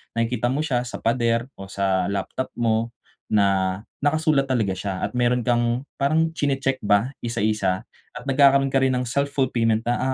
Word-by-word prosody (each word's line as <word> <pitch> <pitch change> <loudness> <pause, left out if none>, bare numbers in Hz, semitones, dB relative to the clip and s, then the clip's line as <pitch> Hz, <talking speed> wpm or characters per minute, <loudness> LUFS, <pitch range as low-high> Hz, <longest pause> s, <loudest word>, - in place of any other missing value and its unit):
nakikita 115 +1 0
mo 135 +5 0
siya 125 -5 -1
sa - - -8
pader 115 +1 +1
o 95 - -7
sa 95 -2 0
laptop 100 +6 -3
mo 115 0 0 0.3
na 95 -2 +1 0.2
nakasulat 145 -1 +2
talaga 115 -7 0
siya, 95 0 -4
at - - -1
meron 125 0 +1
kang, 120 +1 +1 0.2
parang 160 +4 +2
chini-check 135 -4 -1
ba 105 +5 +2
isa-isa, 105 -4 -1 0.3
at 125 - -7
nagkakaroon 135 0 +4
ka 135 - +3
rin 130 -1 +2
ng 125 - 0
self-fulfillment 125 -4 0
na, 120 +1 0
120 Hz, 160 wpm, -23 LUFS, 105-135 Hz, 0.3 s, nagkakaroon